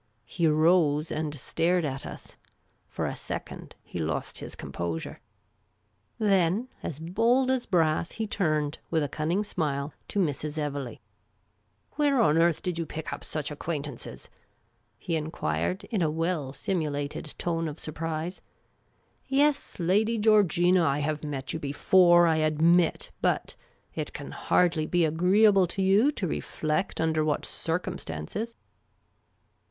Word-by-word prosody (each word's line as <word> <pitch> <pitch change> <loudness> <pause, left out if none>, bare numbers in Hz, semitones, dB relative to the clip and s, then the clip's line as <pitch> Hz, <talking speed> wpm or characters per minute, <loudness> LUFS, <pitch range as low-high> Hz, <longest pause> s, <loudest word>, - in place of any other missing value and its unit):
He 170 -2 0
rose 155 -1 +3
and 155 -1 -2
stared 170 +5 +1
at 135 -1 -4
us. - - -8 0.5
For - - -3
a - - -2
second - - -6
he - - -7
lost 80 -3 -2
his - - -7
composure. 85 -2 -5 1.0
Then, 200 +1 +2
as 150 - -5
bold 230 +10 +2
as 260 -2 -1
brass, 165 -3 +1
he 225 - -2
turned, 155 -8 0
with 160 -2 +1
a - - 0
cunning 160 +8 -1
smile, 150 -7 -2
to - - -5
Mrs. 150 -4 -1
Evelegh. 140 -5 -3 0.5
" - - -41
Where 290 -3 +3
on 165 -8 +4
earth 170 -1 +2
did 180 -2 -2
you 165 - -1
pick, 160 0 -5
up - - -7
such 155 -1 -3
acquaintances? 145 -3 -5 0.4
" - - -41 0.3
he 170 - -2
enquired, 155 - -2
in 210 -5 0
a 160 - +2
well 160 -3 -1
simulated 145 -1 -3
tone 165 -1 -1
of 150 0 -6
surprise. 160 +3 -4 0.5
" - - -41
Yes, 285 -2 +1
Lady 210 +7 +2
Georgina, 185 -5 +4
I 140 -3 +2
have 150 +1 -2
met 140 -3 -4
you 160 - -3
before, 175 +4 +5
I 160 -1 +3
admit; 160 +2 +3
but - - 0 0.2
— - - -39
it - - -4
can - - -7
hardly 165 -3 +2
be 175 0 +3
agree 180 +7 +3
able 195 -3 +5
to 190 +3 -2
you 205 +9 +4
to 190 - -2
reflect 155 +3 -2
under 160 -1 +1
what 150 -1 0
circumstances." 180 - -4
165 Hz, 145 wpm, -27 LUFS, 150-185 Hz, 1.0 s, before